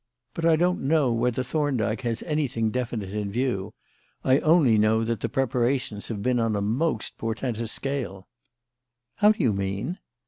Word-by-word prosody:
But 165 - -3
I 165 - +6
don't 180 +3 +1
know 140 -3 +2
whether 120 +2 0
Thorndyke 125 -6 -1
has 120 -2 -2
anything 130 -8 0
definite 115 -5 -3
in 105 -1 -3
view; 120 -4 -2 0.5
I 130 +2 +4
only 155 -10 +4
know 110 +1 +3
that 115 -1 -1
the - - -2
preparations 125 -4 0
have 105 -3 -4
been 125 -1 +2
on 115 -2 +1
a - - 0 0.2
most 155 -10 -1
portentous 115 0 -3
scale." 125 -9 -4 0.9
"How 210 +1 +6
do 200 - -3
you 115 -5 +3
mean?" 100 - -3
120 Hz, 165 wpm, -25 LUFS, 110-140 Hz, 0.9 s, I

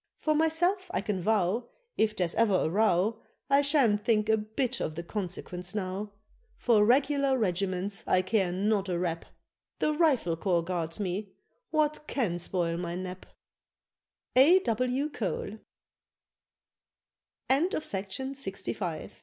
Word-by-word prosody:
For 310 - +1
myself 345 +5 +2
I - - +1
can 200 -4 -2
vow, 215 +3 +1 0.3
If 215 -1 +1
there's 180 -4 -1
ever 225 -4 +3
a 170 - +1
row, 215 +2 +2 0.3
I 280 +1 +6
sha'n't 270 -8 +3
think 215 -1 +2
a 220 - +6
bit 230 +4 -2
of 155 - -3
the 170 - -5
consequence 180 0 -5
now. 200 +1 -3 0.4
For 225 -4 +4
regular 275 +3 +3
regiments 190 -1 -1
I 185 - +3
care 190 -2 +1
not 200 +1 0
a 175 - 0
rap: 170 -1 -2 0.5
The 305 - +1
Rifle 285 - +2
Corps 175 -1 +1
guards 170 0 -3
me, 195 0 -3 0.4
what 305 -1 0
can 190 -10 -1
spoil 170 -1 -1
my 170 0 -4
nap? 185 0 -6 1.1
_A. 335 +9 +6
W. 255 - 0
Cole. 215 -1 -4
210 Hz, 125 wpm, -29 LUFS, 180-255 Hz, 1.1 s, I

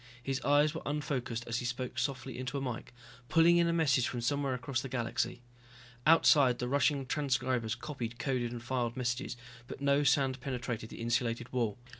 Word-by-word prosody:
His 135 +1 -2
eyes 145 +2 +3
were - - -5
unfocused 135 -5 -2
as 120 0 -2
he 125 - -4
spoke 125 +1 -3
softly 130 -2 -3
into 130 +2 -3
a - - -2
mike, 125 -3 -5 0.4
pulling 165 +2 +5
in 170 0 +4
a - - +2
message 140 -7 +3
from 125 - -3
somewhere 140 +1 0
across 125 0 -2
the 135 - -6
galaxy. 120 0 -2 0.6
Outside 145 -6 +6
the 125 - -2
rushing 140 +1 +2
transcribers 130 -5 0
copied, 120 -3 -5
coded 120 -1 -1
and 120 -1 -6
filed 120 -1 -2
messages, 125 0 -2 0.3
but - - -8
no 140 +1 +3
sound 135 -2 +2
penetrated 120 -4 -4
the - - -9
insulated 120 +1 -1
wall. 115 -5 0
130 Hz, 180 wpm, -32 LUFS, 120-140 Hz, 0.6 s, Outside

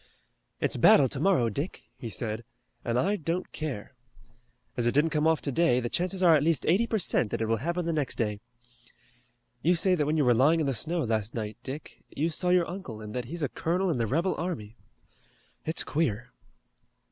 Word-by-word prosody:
"It's - - 0
battle 140 - +6
tomorrow, 165 -5 +2
Dick," 140 - -4
he 120 - -7
said, 110 +2 -3 0.4
"and 120 0 -1
I 195 +11 +2
don't 170 +2 -3
care. 140 -7 -5 0.8
As 120 -1 +1
it 120 - +2
didn't 155 +3 +3
come 155 0 +2
off 160 -1 +2
today 140 -2 +2
the 120 -1 -3
chances 185 +1 0
are 170 -2 +7
at 150 - +3
least 160 +1 +1
eighty 200 +8 +3
per 225 - 0
cent 145 - +1
that - - -3
it 110 - 0
will 115 +1 +1
happen 170 +7 -2
the 165 - 0
next 150 -4 -1
day. 105 -3 -2 1.2
You 175 +6 +3
say 185 +2 +3
that 150 -5 +1
when 155 +1 +1
you 145 - +3
were 125 - +5
lying 145 +8 +4
in 155 - +1
the 135 - 0
snow 165 +8 -1
last 110 -2 -1
night, 110 -2 -4
Dick, 140 +4 -8
you 160 +3 -1
saw 180 +3 0
your 180 -1 +3
uncle 170 - -7
and 105 -1 -8
that 125 -1 -3
he's 165 +6 -5
a 140 - 0
colonel 180 +3 0
in 135 - -1
the 115 - 0
rebel 170 - +1
army. 120 - -4 0.9
It's 160 - +2
queer." 125 -6 -1
150 Hz, 205 wpm, -28 LUFS, 120-170 Hz, 1.2 s, are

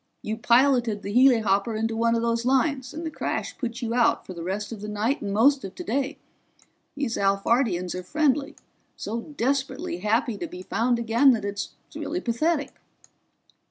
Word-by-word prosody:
You 215 - -2
piloted 235 -2 +3
the 200 - -4
helihopper 225 -4 +4
into 225 +1 -1
one 230 +1 +2
of 230 - 0
those 230 0 0
lines, 265 0 +1
and 325 +2 -6
the 320 - -3
crash - - -3
put 245 -1 -5
you 230 0 -1
out 240 -1 +2
for 185 - -8
the 170 - -8
rest 200 +5 -3
of 220 -3 -7
the 210 - -5
night 215 +7 -1
and 200 - -3
most 265 +7 +4
of 195 -1 -7
today. 275 +5 -2 0.8
These 280 -5 -2
Alphardians 195 -2 +1
are 180 - -4
friendly, 285 - 0 0.4
so 230 +3 -4
desperately 280 +5 -2
happy 220 0 0
to - - -3
be 180 0 -9
found 235 +5 +1
again 235 +4 +4
that 215 -4 -2
it's 200 0 -4 0.2
really 355 - -3
pathetic." 290 +4 0
235 Hz, 175 wpm, -25 LUFS, 210-270 Hz, 0.8 s, helihopper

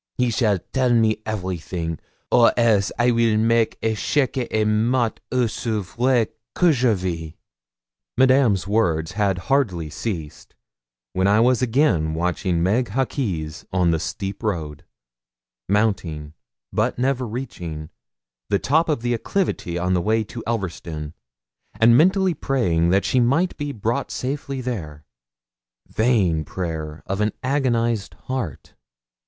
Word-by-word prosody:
He 125 -1 +2
shall 110 -3 +2 0.2
tell 130 -2 +2
me 110 -2 +3
everything, 90 -5 -3 0.3
or 120 -1 +6
else 110 -5 +3
I 120 +1 +3
weel 115 -2 +2
make 115 +1 +2
echec 120 +5 0
et 110 -1 +1
mat 115 +2 +1
aussi 115 -3 0
vrai 120 +4 +1 0.3
que 175 -2 +4
je 125 -4 +2
vis.' 85 -4 -4 0.8
Madame's 130 -7 +4
words 85 -6 +1
had 100 -1 0
hardly 90 - 0
ceased, 80 -5 -6 0.6
when 95 +1 +2
I 105 +2 +4
was 125 +1 +3
again 110 - +2
watching 85 0 0
Meg 115 +7 +2
Hawkes 100 - -2
on 90 -2 +2
the 80 - +1
steep 95 +5 -5
road, 80 -9 -3 0.9
mounting, 90 -8 0 0.4
but - - 0
never 130 0 0
reaching, 85 -10 -6 0.6
the 100 - +3
top 160 +9 +1
of 150 -6 0
the 120 0 +1
acclivity, 115 - -2
on 90 +1 0
the 90 - +2
way 110 +3 +1
to 90 -5 -8
Elverston, 85 -8 -4 0.7
and 115 +1 +6
mentally 185 +5 +4
praying 90 - +1
that 95 +2 +2
she 130 - +2
might 140 +10 +2
be 145 0 -4
brought 115 +3 -2
safely 135 0 -4
there. 80 -13 -5 0.8
Vain 100 -9 +2
prayer 80 -3 -5
of 95 +2 -2
an 105 0 +1
agonised 120 -5 0
heart! 125 - -5
110 Hz, 130 wpm, -22 LUFS, 90-125 Hz, 0.9 s, or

